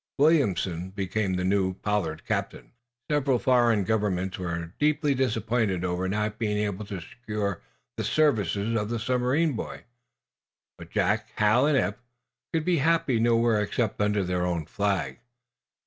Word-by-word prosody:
Williamson 100 - +2
became 95 0 -2
the 90 - -1
new 95 0 +1
Pollard 95 -7 -2
captain. - - -3 0.4
Several 140 -3 +2
foreign 120 -5 +3
governments 95 -3 -1
were 85 -1 -4
deeply 150 -1 +2
disappointed 115 -6 0
over 90 +1 -1
not 105 +2 -2
being 105 -2 0
able 105 0 -2
to 100 -4 -5
secure 105 -2 -4 0.4
the - - -2
services 110 - +1
of 105 -1 -1
the 120 - -1
submarine 125 +6 +1
boys. 115 - -6 1.0
But - - -10
Jack, - - 0
Hal 110 +6 +4
and 150 -2 +3
Eph 105 -3 -1 0.5
could 160 -1 -1
be 180 -2 +2
happy 160 -5 +2
nowhere 115 -1 +3
except 105 +1 -1
under 105 -1 +2
their 90 -1 -1
own 85 -3 -1
Flag. 95 -8 -1
105 Hz, 145 wpm, -27 LUFS, 95-125 Hz, 1.0 s, Hal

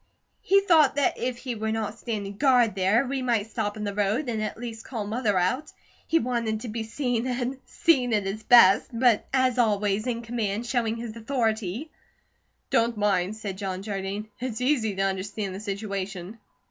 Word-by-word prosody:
"He 395 +1 +4
thought 315 -8 +4
that 285 -2 +1
if 245 0 -2
he 250 0 -4
were 220 -1 -2
NOT 220 0 -3
standing 205 -4 -4
guard 250 -4 +4
there, 200 +7 +2
we 265 +1 -2
might 225 -4 0
stop 215 -2 -2
in 210 - -4
the 205 -1 -2
road 210 +7 0
and 220 -2 -2
at 215 - -3
least 230 -1 -7
call 225 -5 -5
Mother 215 -2 0
out. 250 +12 0 0.4
He 330 - +3
wanted 230 -6 -1
to 245 - -6
be 225 +1 -3
seen, 245 +1 -2
and 250 +1 -2
seen 260 -8 +2
at 210 -3 +1
his 195 +3 -3
best; 215 -4 +6
but 235 -2 +2
as 260 -2 +2
always, 210 -1 +1
in 235 -1 -2
command, 225 -1 -2
showing 230 -2 0
his 230 -1 -6
authority." 225 - -2 0.8
"Don't 235 -3 +2
mind," 200 -1 +1
said 200 -3 -6
John 190 -1 -4
Jardine. 200 +1 -4
"It's 245 -2 -4
easy 250 -6 +1
to 195 - 0
understand 195 +1 -2
the 190 - -6
situation." 200 -1 -5
225 Hz, 185 wpm, -26 LUFS, 205-245 Hz, 0.8 s, best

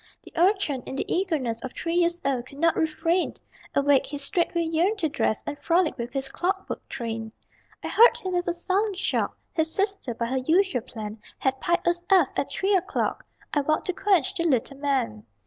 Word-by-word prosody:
The - - -14
Urchin, 350 -6 +2
in - - -5
the - - -2
eagerness 300 - -1
Of 260 - -6
three 335 - -3
years 345 0 +2
old, 255 -3 0
could 275 - -12
not 330 +2 +3
refrain; 330 +3 +1 0.4
Awake, 280 -1 +4
he 290 - -4
straightway 340 +4 0
yearned 335 +6 +1
to 325 -6 0
dress 220 -7 0
And 290 - -5
frolic 335 -1 +2
with 240 0 -5
his 270 -1 -2
clockwork 380 +7 -3
train. 225 -3 -4 0.5
I - - -3
heard 470 +2 +6
him 370 -1 -4
with 355 0 0
a 345 - +1
sullen 385 +4 0
shock. 375 - -1 0.2
His 320 -1 0
sister, 390 - -1
by 235 - -2
her 260 +3 -1
usual 320 0 +2
plan, 215 -2 -8 0.2
Had 265 0 -1
piped 345 0 +1
us 345 0 +2
aft 370 -8 +4
at - - -1
3 390 +2 0
o'clock 380 +1 0 0.3
I 290 - +3
vowed 310 +2 0
to 370 - 0
quench 380 -7 +2
the 335 - -1
little 270 -1 0
man. 265 - -1
320 Hz, 200 wpm, -26 LUFS, 265-360 Hz, 0.5 s, heard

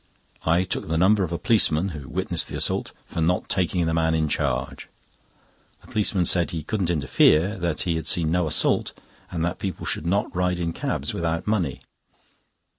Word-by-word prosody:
I 85 +3 +4
took 90 - -4
the 80 +1 0
number 100 +4 +4
of 85 - -3
a 85 - -1
policeman 90 -2 +3
(who 75 -6 -8
witnessed - - -1
the - - -7
assault) - - 0
for 85 - -4
not 90 +3 +1
taking 90 -2 +1
the 80 - 0
man 80 0 +2
in 80 -1 +1
charge. 70 -4 -2 0.9
The - - -18
policeman 100 -4 +1
said 85 0 +2
he 80 -2 -4
couldn't 95 0 -1
interfere, 80 +4 +3
that 85 -3 -1
he 85 -2 0
had 80 -1 -5
seen 80 -2 +1
no 90 -1 +1
assault, 75 - +1 0.4
and 85 -1 -2
that 85 +1 -3
people 95 -2 -4
should 80 - -2
not 100 +1 0
ride 90 0 +1
in 85 -1 -2
cabs - - -3
without 85 +1 -2
money. 95 -11 -1
85 Hz, 190 wpm, -24 LUFS, 80-90 Hz, 0.9 s, I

